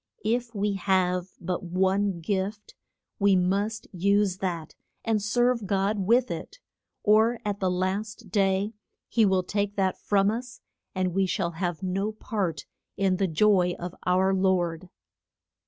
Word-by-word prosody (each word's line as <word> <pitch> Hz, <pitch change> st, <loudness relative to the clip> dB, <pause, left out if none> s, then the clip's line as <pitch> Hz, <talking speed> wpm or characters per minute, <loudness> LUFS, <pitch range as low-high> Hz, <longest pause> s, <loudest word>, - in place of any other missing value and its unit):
If 235 Hz, +1 st, -1 dB
we 205 Hz, 0 st, 0 dB
have 185 Hz, -2 st, +1 dB
but 180 Hz, +1 st, -3 dB
one 190 Hz, +1 st, 0 dB
gift 200 Hz, +4 st, -3 dB, 0.5 s
we 200 Hz, -1 st, +4 dB
must 200 Hz, +4 st, 0 dB
use 200 Hz, +1 st, +1 dB
that 170 Hz, -4 st, -3 dB, 0.3 s
and 220 Hz, -2 st, +1 dB
serve 240 Hz, +1 st, +1 dB
God 200 Hz, +2 st, +1 dB
with 245 Hz, +2 st, +3 dB
it, -, -, -6 dB, 0.5 s
or 220 Hz, +2 st, +4 dB
at 205 Hz, -1 st, -2 dB
the 190 Hz, -, +1 dB
last 190 Hz, +4 st, -3 dB
day 195 Hz, +1 st, +1 dB, 0.3 s
he 225 Hz, -3 st, +3 dB
will 190 Hz, -1 st, +2 dB
take 205 Hz, +1 st, -2 dB
that 190 Hz, -2 st, 0 dB
from 200 Hz, 0 st, +2 dB
us, 245 Hz, +2 st, -6 dB, 0.4 s
and 185 Hz, -1 st, 0 dB
we 195 Hz, 0 st, +2 dB
shall 180 Hz, -2 st, -1 dB
have 175 Hz, +1 st, -3 dB
no 195 Hz, +3 st, -1 dB
part 190 Hz, -, -3 dB, 0.3 s
in 190 Hz, -2 st, +2 dB
the 195 Hz, 0 st, +1 dB
joy 180 Hz, +1 st, +3 dB
of 175 Hz, 0 st, -6 dB
our 190 Hz, +1 st, +3 dB
lord. 185 Hz, -2 st, 0 dB
195 Hz, 145 wpm, -27 LUFS, 185-210 Hz, 0.5 s, we